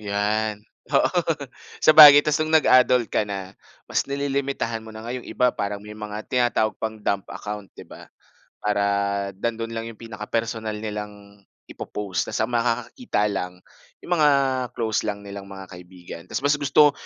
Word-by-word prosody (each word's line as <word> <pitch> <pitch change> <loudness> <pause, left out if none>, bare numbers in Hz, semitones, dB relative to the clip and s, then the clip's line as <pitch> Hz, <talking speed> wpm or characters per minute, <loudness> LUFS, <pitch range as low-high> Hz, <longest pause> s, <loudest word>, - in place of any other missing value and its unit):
'Yan, 105 +1 -1 0.3
oo. 150 +6 +2 0.6
Sabagay, 150 -2 +10
ta's 150 0 +1
no'ng 155 0 0
nag-adult 125 -4 +4
ka - - +2
na, 95 -1 -5 0.3
mas - - -1
nililimitahan 140 -4 -2
mo 110 - -13
na, 110 0 -10
nga 120 - -4
'yong 125 -1 -7
iba, 125 -1 +1
parang 100 0 -4
may 105 - -9
mga 105 0 -6
tinatawag 120 -3 +1
pang 110 0 -3
"dump 100 -2 -2
account," 105 -2 -7
'di - - -10
ba? - - -13 0.5
Para 105 -1 0 0.5
nandoon 115 +2 -3
lang 115 0 -4
'yong 115 - -10
pinaka-personal 115 -1 -4
nilang 105 -1 -7 0.2
ipo-post. 100 -5 -4
Ta's - - -3
ang 125 - -6
makakakita 115 - -1
lang, 90 -1 -5 0.4
'yong 180 - -5
mga 150 -1 +6 0.5
close 110 -2 0
lang 100 0 -4
nilang 100 -1 -8
mga 95 -1 -10
kaibigan. 90 -1 -11
Ta's - - -4
mas 145 +1 +3
gusto 145 +1 +5
110 Hz, 160 wpm, -23 LUFS, 100-125 Hz, 0.6 s, Sabagay